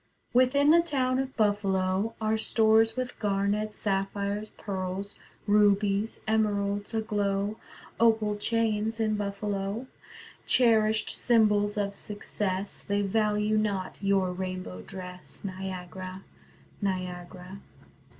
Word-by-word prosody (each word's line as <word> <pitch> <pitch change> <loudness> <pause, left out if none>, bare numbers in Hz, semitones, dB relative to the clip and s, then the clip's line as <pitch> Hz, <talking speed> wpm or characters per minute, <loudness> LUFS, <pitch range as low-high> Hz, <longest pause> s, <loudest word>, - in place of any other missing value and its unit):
Within 270 +4 +5
the 340 +1 +7
town 260 -6 0
of 265 0 -4
Buffalo 200 0 +1
Are 220 0 +1
stores 220 +1 +3
with 255 -1 -4
garnets, 205 +1 0
sapphires, 200 +1 -1
pearls, 195 0 -4 0.3
Rubies, 205 0 +2
emeralds 205 -1 0
aglow, 205 -1 -1 0.4
Opal 220 -2 +3
chains 225 0 0
in 215 -1 +1
Buffalo, 200 +2 -3 0.6
Cherished 220 -3 +4
symbols 210 -3 +2
of 200 -1 -1
success. 200 -1 -3
They 205 0 0
value 210 +1 +1
not 200 -3 -2
your 195 -2 +2
rainbow 185 - -5
dress: 180 - -8
Niagara, 185 0 -6 0.6
Niagara. 185 -1 -4
205 Hz, 100 wpm, -28 LUFS, 195-220 Hz, 0.6 s, the